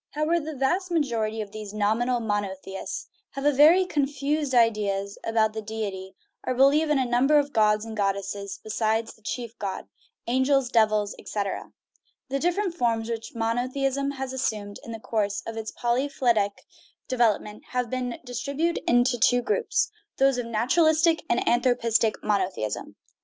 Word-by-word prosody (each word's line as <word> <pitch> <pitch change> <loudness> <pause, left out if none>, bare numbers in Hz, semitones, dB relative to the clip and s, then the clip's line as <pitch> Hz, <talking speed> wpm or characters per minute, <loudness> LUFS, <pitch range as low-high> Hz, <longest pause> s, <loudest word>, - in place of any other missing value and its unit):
However, 305 +3 +1
the 310 -1 -6
vast 350 +8 0
majority 230 -9 0
of 205 -2 -7
these 210 -1 -8
nominal 230 +4 +1
monotheists 200 -3 -3 0.3
have 275 - -5
very 325 +7 +7
confused 285 -2 -1
ideas 205 -4 +1
about 220 -1 +1
the 220 - -4
deity, 200 -3 -5 0.3
or 255 - -1
believe 285 +4 +4
in 300 - +3
a 260 - +1
number 250 +5 +3
of 285 -1 +1
gods 210 0 +3
and 225 -1 -7
god 200 -2 +1
desses 200 0 -5
besides 220 +1 -1
the 220 - -24
chief 235 +1 -5
god 195 -2 -4 0.4
angels, 260 +1 +2
devils, 215 -3 +2
etc. 200 -2 -4 0.6
The 275 +1 -1
different 355 +3 0
forms 230 -7 0
which 225 0 -5
monotheism 255 +4 0
has 265 -1 -5
assumed 210 -6 -3
in 230 - -8
the 225 - -6
course 205 -2 -1
of 225 - -5
its 220 -1 -5
polyphyletic 240 -4 0 0.5
development 215 -4 0
may 250 - +1
be 250 0 -3
distributed 280 +7 -2
in 245 0 +5
two 245 0 +2
groups 465 - 0 0.3
those 270 -2 +3
of 240 - -3
naturalistic 315 +8 +3
and 235 - +1
anthropistic 235 -2 +2
monotheism. 190 - -1
235 Hz, 150 wpm, -26 LUFS, 215-275 Hz, 0.6 s, very